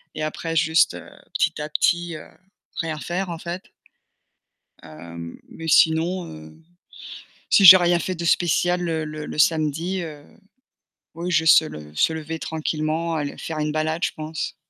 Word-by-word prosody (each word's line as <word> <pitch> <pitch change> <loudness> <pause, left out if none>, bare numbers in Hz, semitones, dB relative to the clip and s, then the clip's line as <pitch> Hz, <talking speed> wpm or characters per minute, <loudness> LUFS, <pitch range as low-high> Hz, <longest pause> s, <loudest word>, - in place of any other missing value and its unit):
et 155 - -4
après 165 +1 -4
juste, 160 0 +3
heu, - - -10 0.2
petit - - 0
à 150 - -5
petit, 170 +2 0
heu, 155 - -10 0.5
rien 160 -2 -4
faire 180 +4 -3
en 170 - -5
fait. 175 +2 -6 1.2
Hem, 85 +1 -10
mais 165 - -9
sinon, 165 +3 +3
heu, 80 0 -12 1.0
si 200 - +5
j'ai 185 0 +12
rien 175 0 +2
fait 185 +3 -3
de 170 -1 -6
spécial 175 +1 +2
le 165 -2 -2
le 155 0 -7
le - - -8
samedi, 160 +4 +1
heu, 150 -3 -8 0.9
oui 175 +2 -4
je 160 -2 +2
se 160 0 +6
le 75 - -10
se 160 - +2
lever 160 0 -5
tranquillement, 160 +1 -2
aller 145 -2 -4
faire 160 -1 -5
une 150 0 -1
balade 155 +2 -2
je - - 0
pense, 155 +1 -5
160 Hz, 165 wpm, -22 LUFS, 155-170 Hz, 1.2 s, j'ai